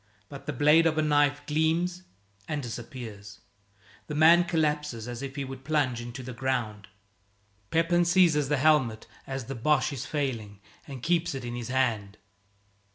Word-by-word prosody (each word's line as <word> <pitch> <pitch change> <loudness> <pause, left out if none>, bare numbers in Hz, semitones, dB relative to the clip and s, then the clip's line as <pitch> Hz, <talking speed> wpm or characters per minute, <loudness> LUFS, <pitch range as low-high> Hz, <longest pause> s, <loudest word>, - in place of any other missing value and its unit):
But 140 +1 -10
the - - 0
blade 150 +4 +5
of 160 -1 0
a 155 - +2
knife 145 -1 +2
gleams 165 +4 0 0.5
and 150 -2 -3
disappears. 115 -4 -8 0.7
The 150 - -5
man 165 +3 +6
collapses 150 -8 -1
as 120 0 -6
if 135 0 -6
he 140 -2 -3
would 130 0 -9
plunge 135 -5 0
into 120 +2 -7
the 125 +1 -7
ground. 120 -5 -2 0.8
Pepin 170 +2 +2
seizes 170 -5 +3
the 150 - +2
helmet 135 -6 +2 0.2
as 135 -2 -4
the 135 - -5
Boche 140 +3 +1
is 140 +2 -5
failing 115 -10 -3 0.3
and 135 -4 -8
keeps 170 -3 +1
it 130 -2 -5
in 120 - -5
his 120 -1 -5
hand. 115 -6 -1
140 Hz, 160 wpm, -27 LUFS, 120-155 Hz, 0.8 s, man